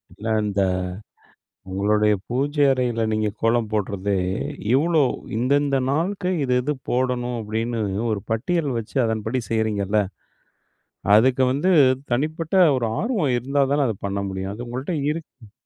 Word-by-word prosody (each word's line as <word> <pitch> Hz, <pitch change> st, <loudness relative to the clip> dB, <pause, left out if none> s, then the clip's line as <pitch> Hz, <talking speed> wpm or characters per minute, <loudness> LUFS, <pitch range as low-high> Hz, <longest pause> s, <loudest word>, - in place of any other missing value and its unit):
இல்ல. 110 Hz, -, -7 dB, 0.2 s
இந்த 100 Hz, -1 st, 0 dB, 1.1 s
உங்களுடைய 105 Hz, +2 st, +2 dB, 0.2 s
பூஜை 145 Hz, +4 st, +1 dB
அறையில 125 Hz, -3 st, 0 dB
நீங்க 110 Hz, -1 st, 0 dB
கோலம் 115 Hz, -1 st, +2 dB
போடுறதே, 100 Hz, -1 st, -1 dB, 0.6 s
இவ்ளோ 155 Hz, +2 st, +3 dB, 0.3 s
இந்தந்த 140 Hz, +3 st, +2 dB
நாளுக்கு 180 Hz, +5 st, -1 dB
இது, 125 Hz, -2 st, +1 dB
இது 150 Hz, +3 st, 0 dB, 0.2 s
போடணும் 125 Hz, -1 st, 0 dB
அப்பிடின்னு 115 Hz, +2 st, -2 dB, 0.3 s
ஒரு 105 Hz, -, -1 dB
பட்டியல் 155 Hz, +7 st, 0 dB
வச்சு 115 Hz, +4 st, -7 dB
அதன்படி 110 Hz, +2 st, -1 dB
செய்கிறீங்கள்ல. 105 Hz, -2 st, +1 dB, 1.1 s
அதுக்கு 130 Hz, +3 st, +4 dB
வந்து 155 Hz, +8 st, +1 dB, 0.4 s
தனிப்பட்ட 155 Hz, +6 st, -1 dB, 0.2 s
ஒரு 120 Hz, -, -1 dB
ஆர்வம் 200 Hz, -, 0 dB
இருந்தா 140 Hz, +4 st, 0 dB
தானே 145 Hz, 0 st, +3 dB
அதை 110 Hz, -, -2 dB
பண்ண 100 Hz, 0 st, -2 dB
முடியும். 95 Hz, +1 st, -4 dB
அது 120 Hz, +3 st, -7 dB
உங்கள்ட்ட 130 Hz, +8 st, -3 dB, 0.2 s
இருக்கு. 130 Hz, -9 st, -9 dB
120 Hz, 125 wpm, -23 LUFS, 110-145 Hz, 1.1 s, அதுக்கு